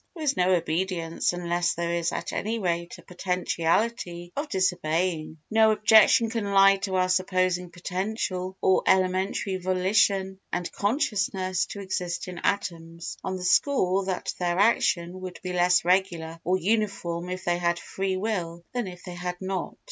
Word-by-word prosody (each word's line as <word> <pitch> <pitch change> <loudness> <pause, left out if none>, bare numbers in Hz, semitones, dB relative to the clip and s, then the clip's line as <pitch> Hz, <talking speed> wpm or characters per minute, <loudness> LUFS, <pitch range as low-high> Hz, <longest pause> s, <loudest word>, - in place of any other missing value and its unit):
There 320 - -6
is 280 -3 +1
no 185 +1 +3
obedience 170 0 -1
unless 175 0 -1
there 170 0 -2
is 170 0 0
at - - -4
any 220 +3 -1
rate 170 -4 -2
a - - -15
potentiality 180 0 -1
of 295 +2 -3
disobeying. 175 -3 0
No 220 0 +5
objection 220 +1 +5
can 225 -3 -2
lie 195 0 +5
to 195 -1 -3
our 185 0 +2
supposing 185 -1 +1
potential 185 +1 -3
or 190 - +4
elementary 190 +1 +1
volition 190 +1 +1
and 175 -1 -2
consciousness 200 - 0
to 200 - -7
exist 180 -2 -3
in 180 -1 -6
atoms, 170 -4 -3
on 190 0 -2
the 185 - -6
score 190 -3 +2
that 185 -1 -2
their 175 -1 0
action 185 -4 +2
would 185 -1 -7
be 180 -1 -3
less 180 0 +3
regular 175 -3 +1
or 185 +1 +2
uniform 185 -3 -1
if 185 +1 -5
they 175 0 +1
had 170 0 +1
free 190 +2 -3
will 175 -5 -3
than 245 -4 -2
if 180 -1 -10
they 180 - -7
had 180 0 -5
not. 190 -1 -3
185 Hz, 160 wpm, -26 LUFS, 175-195 Hz, -, No